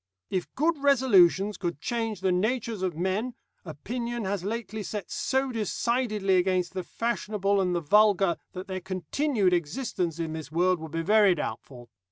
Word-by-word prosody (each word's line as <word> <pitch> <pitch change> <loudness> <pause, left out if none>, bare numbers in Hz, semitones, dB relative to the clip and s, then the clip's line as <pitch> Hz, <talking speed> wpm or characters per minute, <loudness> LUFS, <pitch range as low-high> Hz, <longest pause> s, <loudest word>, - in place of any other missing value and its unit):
If 185 -2 -2
good 315 +2 +1
resolutions 210 -8 +4
could 175 -5 -3
change 225 -1 -3
the 190 -1 +2
natures 220 +3 -1
of 185 -4 -1
men, 200 +8 -1 0.3
opinion 235 - -4
has 190 -1 -2
lately 220 0 -4
set 205 -1 -5
so 270 -1 0
decidedly 215 -3 0
against 180 0 +1
the 190 - -2
fashionable 205 -3 -1
and 180 -1 0
the 170 - 0
vulgar 195 +1 +4 0.2
that 185 0 -6
their 185 -1 -4
continued 190 - 0
existence 175 - -2
in 165 -2 -3
this 160 -1 -7
world 180 +2 +2
would 160 -1 -8
be 165 0 -2
very 205 0 +5
doubtful. 120 -3 -6
195 Hz, 160 wpm, -27 LUFS, 175-230 Hz, 0.3 s, very